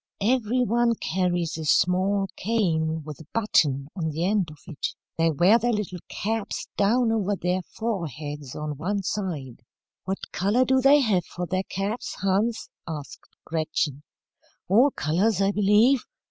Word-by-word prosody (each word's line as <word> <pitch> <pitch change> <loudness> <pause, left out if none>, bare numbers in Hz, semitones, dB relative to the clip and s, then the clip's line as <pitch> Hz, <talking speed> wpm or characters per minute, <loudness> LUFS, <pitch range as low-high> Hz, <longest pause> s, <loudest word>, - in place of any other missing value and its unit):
Every 250 +1 +2
one 235 0 +2
carries 175 -4 -1
a 160 - -4
small 190 +5 +3
cane 160 -7 0
with 150 -2 -8
a 160 - -13
button 145 -11 +2
on 165 -4 -2
the 160 +3 -2
end 195 -3 +1
of 150 - -12
it. 150 - -4 0.2
They 165 0 +2
wear 175 +9 +5
their 240 0 +1
little 200 -4 -3
caps 215 0 -3
down 225 +4 +3
over 205 -2 0
their 180 0 -1
foreheads 155 - -5
on 150 -1 -4
one 195 +4 -1
side." 160 - -4 0.4
"What 190 +1 -4
colour 210 +7 +2
do 260 +1 +3
they 280 +2 +6
have 200 -8 +1
for 180 - -5
their 185 +3 -2
caps, 200 +5 -3
Hans?" 205 +4 +1 0.2
asked 150 -3 -7 0.2
Gretchen. 155 -3 -1 0.7
"All 235 +10 +5
colours, 185 - 0
I 195 0 +3
believe. 210 +6 +4
190 Hz, 150 wpm, -25 LUFS, 160-220 Hz, 0.7 s, they